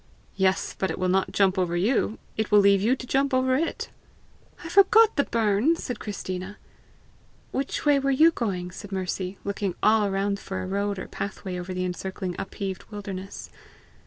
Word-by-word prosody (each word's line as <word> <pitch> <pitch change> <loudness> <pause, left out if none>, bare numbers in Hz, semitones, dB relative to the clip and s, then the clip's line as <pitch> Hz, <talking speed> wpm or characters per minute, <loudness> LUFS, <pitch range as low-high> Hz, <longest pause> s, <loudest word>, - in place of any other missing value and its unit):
"Yes; 190 -1 +1
but 190 - 0
it - - -3
will 185 - 0
not 190 +1 +1
jump 195 -1 +2
over 175 -1 0
you; 220 +3 +1 0.2
it 220 -1 -1
will 210 - +5
leave 200 -1 +5
you 235 +6 +3
to 255 - -8
jump 270 +1 +1
over 255 0 +2
it!" 325 +5 -2 0.7
"I - - -6
forgot 420 +4 +6
the 285 - +2
burn!" 225 +7 +2
said 245 -8 -5
Christina. 190 -1 -5 0.9
"Which 270 +3 -3
way 290 -1 +5
were 275 0 0
you 310 +5 +6
going?" 190 - -3
asked 200 +2 -10
Mercy, 185 0 -3
looking 200 -2 -2
all 215 -1 +4
around 200 +1 -1
for 185 -2 -5
road 200 +1 -1
or - - -6
pathway 190 -2 -5
over 180 +1 -6
the 185 0 -2
encircling 180 0 -4
upheaved 195 -1 -5
wildernesses. 200 -2 -7
200 Hz, 175 wpm, -26 LUFS, 190-245 Hz, 0.9 s, forgot